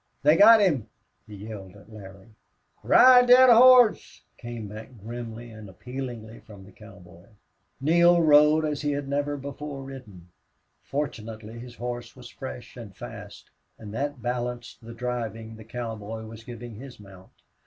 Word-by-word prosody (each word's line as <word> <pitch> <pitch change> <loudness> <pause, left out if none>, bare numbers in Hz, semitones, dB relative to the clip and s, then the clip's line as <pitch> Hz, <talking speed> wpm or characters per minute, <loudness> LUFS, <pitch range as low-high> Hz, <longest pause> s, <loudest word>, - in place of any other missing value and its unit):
"They 150 +2 +5
got 220 +5 +8
him!" 145 - +1 0.4
he 105 - -11
yelled 100 -2 -10
at 105 +2 -17
Larry. 100 0 -13 0.5
"Ride 250 -1 +6
thet 255 +1 +7
hoss!" 245 -1 +5 0.2
came 120 -3 -7
back 110 +3 -10
grimly 115 +2 -8
and 110 -2 -12
appealingly 120 +1 -8
from 100 -3 -15
the 100 - -16
cowboy. 95 -3 -16 0.5
Neale 170 +4 +4
rode 150 0 +5
as 150 -2 -3
he 145 -1 -1
had 140 -1 -4
never 145 +1 -2
before 140 0 -8
ridden. 110 -10 -12 0.5
Fortunately 115 -5 -6
his 120 0 -11
horse 120 0 -7
was - - -12
fresh 65 -1 -9
and - - -11
fast, - - -11 0.3
and 105 -2 -10
that 140 0 -4
balanced 120 -1 -5
the 115 +1 -10
driving 115 -2 -5
the 110 - -12
cowboy 115 -1 -7
was 110 0 -11
giving 120 -1 -9
his 125 -1 -12
mount. 95 -2 -16
120 Hz, 150 wpm, -25 LUFS, 110-145 Hz, 0.5 s, got